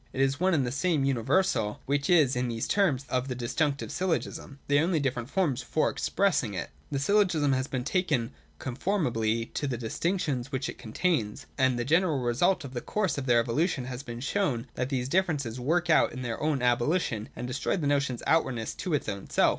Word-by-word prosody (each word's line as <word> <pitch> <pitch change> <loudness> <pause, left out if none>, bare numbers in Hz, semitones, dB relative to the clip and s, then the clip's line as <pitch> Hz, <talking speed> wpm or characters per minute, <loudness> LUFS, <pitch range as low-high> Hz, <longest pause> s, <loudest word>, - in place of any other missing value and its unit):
It - - -5
is 135 +1 +2
one 185 0 +3
and 140 -4 +2
the 120 - -2
same 145 +2 +1
universal 125 - +1
which 140 +1 0
is 155 -8 +5
in 125 0 0
these 115 -1 -2
terms 155 -10 +2
of 130 0 -1
the 125 - -3
Disjunctive 140 +4 -1
syllogism; 170 -5 -2
they 145 0 +4
are - - +3
only 170 -1 +1
different 125 -3 -2
forms 155 -8 0
for 155 - 0
express 200 -2 +1
ing 105 -7 -5
it. 85 - -4 0.2
192.] 140 - -2
The - - 0
syllogism 175 -8 +3
has 130 +1 0
been 130 -3 -3
taken 150 -9 0 0.3
conformably 120 - -1
to 145 - -2
the 125 -3 -2
distinctions 135 - -2
which 130 -1 -2
it - - -7
contains; 125 - -1
and 130 -3 +2
the 120 - -1
general 165 +1 +3
result 130 +10 +1
of 130 - -8
the 120 - -3
course 195 -8 -1
of 135 - -5
their 120 -1 +5
evolution 135 +3 0
has 125 0 -5
been 120 -3 -7
to - - -4
show 145 - 0
that 125 - -2
these 130 -3 -1
differences 145 -8 0
work 170 +7 +1
out 155 -5 +3
their 120 -3 -4
own 150 -4 0
abolition 120 - +1
and 125 - -5
destroy 130 +9 -1
the 160 - -2
notion's 140 -4 0
outwardness 125 -9 +1
to 175 -5 -2
its 145 - -2
own 100 -2 -5
self. - - +4
135 Hz, 210 wpm, -28 LUFS, 120-160 Hz, 0.3 s, is